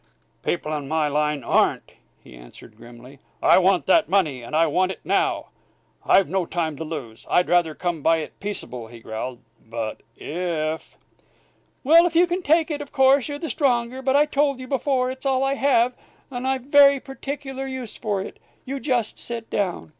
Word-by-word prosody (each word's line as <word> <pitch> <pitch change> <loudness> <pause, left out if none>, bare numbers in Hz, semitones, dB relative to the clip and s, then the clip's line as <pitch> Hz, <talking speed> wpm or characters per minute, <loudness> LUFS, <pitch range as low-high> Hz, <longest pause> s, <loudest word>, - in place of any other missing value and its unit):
"People 155 -3 -2
in 145 -2 -5
my 155 0 +1
line 150 -1 0
ain't," - - +1 0.3
he - - -14
answered, - - -14
grimly. 120 +4 -14 0.2
"I - - +5
want 190 0 +2
that 325 - +3
money! 160 -10 +1
and 120 +6 -6
I 165 +1 +4
want 185 +2 +1
it - - -8
now! - - 0 0.5
I've 195 - +4
no 180 +1 -1
time 160 -3 -2
to 160 - -4
lose. 145 -9 -7
I'd 180 - +3
rather 170 -3 +2
come 175 -3 -3
by 165 +3 +3
it 155 - -7
peaceable," 125 - -5
he 115 +1 -12
growled, 120 +3 -6 0.2
"but 115 -1 -5 0.2
if 160 -1 -4 0.5
" - - -40
"Well, 335 +5 +6
you 340 +2 +4
can 355 +1 -2
take 320 0 +2
it; 295 -1 -3
of 290 - -9
course, 265 -1 +4
you're 290 -1 -4
the 325 - -5
stronger. 255 -3 0
But 265 0 +1
I 295 +1 +5
told 280 -2 0
you 255 - -7
before, 260 -1 0
it's 260 +1 -5
all 265 0 +2
I 270 0 +1
have, 255 -3 +2 0.4
and 250 0 -4
I've 265 -1 -1
very 280 0 +6
particular 270 0 -6
use 260 -4 -6
for 205 -3 -2
it. - - -10 0.3
You 275 +1 -4
just 250 -6 -1
sit 230 -1 -6
down!" 190 -6 -2
210 Hz, 190 wpm, -23 LUFS, -, 0.5 s, Well